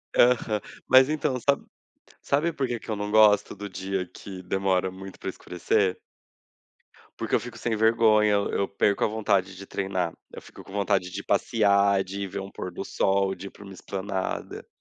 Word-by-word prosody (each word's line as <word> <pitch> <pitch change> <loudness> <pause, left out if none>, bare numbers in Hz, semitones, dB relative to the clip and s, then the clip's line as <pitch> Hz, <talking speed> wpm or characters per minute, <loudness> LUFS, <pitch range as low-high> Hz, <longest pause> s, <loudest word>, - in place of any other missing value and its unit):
Aham, 115 -4 +3 0.3
mas 130 +1 +7
então 145 -4 0
sabe 140 +3 +1 0.6
sabe 155 +4 +1
por 135 -3 -1
que 120 -1 -3
que - - -13
eu 110 - 0
não 105 0 -4
gosto 105 -2 +5
do 100 0 -7
dia 95 0 -3
que 95 +1 -10
demora 95 0 0
muito 95 0 -10
para - - -4
escurecer? 90 +1 -1 1.2
Porque - - -4
eu - - +5
fico 120 -1 -9
sem 115 0 -1
vergonha. 110 -1 +4
Eu 100 - 0
eu 100 - 0
perco 100 0 +1
a - - +4
vontade 100 -3 0
de 100 +2 -9
treinar. 95 -4 -2 0.2
Eu - - -9
fico - - -13
com - - -14
vontade 100 -2 0
de 100 - -5
ir - - -21
passear, 100 -2 +3
de 100 +2 -6
ir - - -3
ver 95 - -5
um 95 +1 -8
pôr 90 - -6
do 90 - -6
sol, 95 0 +1
de 95 +1 -8
ir - - -7
para - - -15
uma 100 -1 -10
esplanada. 95 0 -4
100 Hz, 200 wpm, -26 LUFS, 95-110 Hz, 1.2 s, mas